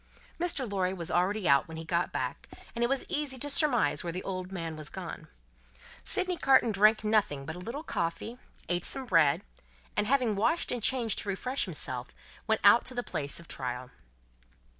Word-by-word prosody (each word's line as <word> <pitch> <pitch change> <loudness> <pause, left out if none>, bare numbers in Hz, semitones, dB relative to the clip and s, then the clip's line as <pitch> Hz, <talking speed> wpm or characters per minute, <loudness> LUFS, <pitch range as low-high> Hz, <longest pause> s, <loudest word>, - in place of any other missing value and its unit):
Mr. 335 -7 0
Lorry 190 -3 0
was 170 -3 -5
already 190 +2 +1
out 140 0 +4
when 160 -1 -8
he 160 - -6
got 170 +1 0
back, - - -4 0.2
and 235 - -1
it - - +4
was 275 -1 0
easy 290 -3 -1
to 290 +3 -1
surmise 280 - +2
where 170 - -3
the 180 +2 -4
good - - -10
old 185 -1 -4
man 165 -4 -4
was 155 -1 -5
gone. 170 -4 -7 0.8
Sydney 365 -1 +2
Carton 265 -6 +4
drank 215 +2 +4
nothing 210 -11 +1
but 160 - -5
a - - -8
little 235 +11 -5
coffee, 220 - -3 0.3
ate 175 0 +1
some 270 -1 -2
bread, 165 - +3 0.5
and, 210 - +1
having 250 -4 +2
washed 320 +12 +1
and 245 - -2
changed 235 -1 +2
to 205 - -4
refresh 250 +8 -1
himself, 130 -8 -4 0.3
went 220 -1 +1
out 205 +4 +7
to 255 - -2
the 245 - -1
place 140 -7 -3
of 170 - -13
trial. 125 -1 -4
200 Hz, 195 wpm, -30 LUFS, 165-250 Hz, 0.8 s, out